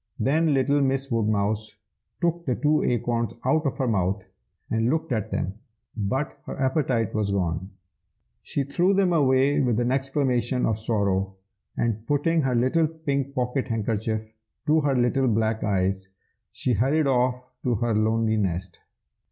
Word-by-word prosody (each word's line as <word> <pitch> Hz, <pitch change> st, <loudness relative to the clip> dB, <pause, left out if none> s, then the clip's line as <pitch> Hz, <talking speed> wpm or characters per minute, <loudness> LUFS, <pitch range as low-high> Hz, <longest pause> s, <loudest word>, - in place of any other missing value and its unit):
"Then 155 Hz, +2 st, +2 dB
little 140 Hz, +2 st, +2 dB
Miss 135 Hz, 0 st, 0 dB
Woodmouse 110 Hz, -1 st, 0 dB, 0.4 s
took 170 Hz, -1 st, 0 dB
the 125 Hz, -, +1 dB
two 150 Hz, +3 st, +2 dB
acorns 120 Hz, -1 st, 0 dB
out 155 Hz, +3 st, +2 dB
of 135 Hz, -, -3 dB
her 130 Hz, -, 0 dB
mouth, 100 Hz, -2 st, 0 dB, 0.5 s
and 115 Hz, +1 st, +1 dB
looked 160 Hz, +1 st, -1 dB
at 110 Hz, -4 st, -1 dB
them; 100 Hz, +3 st, -3 dB, 0.4 s
but 120 Hz, +7 st, -2 dB
her -, -, -6 dB
appetite 130 Hz, -5 st, +1 dB
was 105 Hz, -2 st, 0 dB
gone. 95 Hz, -2 st, -1 dB, 0.7 s
She 140 Hz, -, -2 dB
threw 175 Hz, +8 st, +1 dB
them 190 Hz, -2 st, +3 dB
away 135 Hz, -2 st, +3 dB
with 120 Hz, -4 st, +1 dB
an 120 Hz, +1 st, +1 dB
exclamation 130 Hz, -2 st, 0 dB
of 110 Hz, -1 st, 0 dB
sorrow, 100 Hz, -3 st, 0 dB, 0.4 s
and 115 Hz, -1 st, -1 dB
putting 160 Hz, +3 st, +2 dB
her 130 Hz, -3 st, 0 dB
little 130 Hz, +7 st, +3 dB
pink 140 Hz, -4 st, -3 dB
pocket 125 Hz, +1 st, -1 dB
handkerchief 110 Hz, -1 st, -1 dB
up -, -, -22 dB, 0.4 s
to 155 Hz, +1 st, +3 dB
her 145 Hz, -2 st, +1 dB
little 125 Hz, +2 st, +2 dB
black 110 Hz, -1 st, +1 dB
eyes, 95 Hz, -1 st, 0 dB, 0.4 s
she 125 Hz, -, 0 dB
hurried 135 Hz, +8 st, +2 dB
off 125 Hz, -1 st, +2 dB, 0.2 s
to 125 Hz, -2 st, 0 dB
her 115 Hz, +2 st, 0 dB
lonely 110 Hz, +1 st, +2 dB
nest." 90 Hz, -3 st, -2 dB
125 Hz, 155 wpm, -25 LUFS, 110-140 Hz, 0.7 s, them